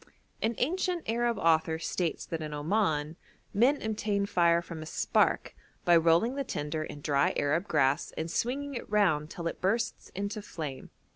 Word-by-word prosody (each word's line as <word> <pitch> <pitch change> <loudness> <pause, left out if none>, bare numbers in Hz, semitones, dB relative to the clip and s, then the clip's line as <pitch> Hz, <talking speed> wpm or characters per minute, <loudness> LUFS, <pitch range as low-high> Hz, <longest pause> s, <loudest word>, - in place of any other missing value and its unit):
An 225 +1 0
ancient 355 +4 -1
Arab 235 0 +1
author 160 -2 +2
states 165 0 -2
that 165 -1 -4
in 150 -1 -4
Oman 155 -2 0 0.4
'men 250 +8 +3
obtain 210 -2 0
fire 170 -3 +3
from 170 -2 -7
a - - -6
spark, - - +1 0.3
by 175 - +6
rolling 165 +8 +4
the 275 0 -2
tinder 150 - -3
in 145 -1 -8
dry 140 -1 +2
Arab 160 +7 +1
grass 140 -2 +2
and 160 +1 -3
swinging 280 +7 -1
it 240 - -6
round 175 -8 +2
till 170 - -7
it 165 - -3
bursts 225 +5 -1
into 200 +3 -3
flame.' 150 -9 -6
170 Hz, 165 wpm, -30 LUFS, 155-220 Hz, 0.4 s, by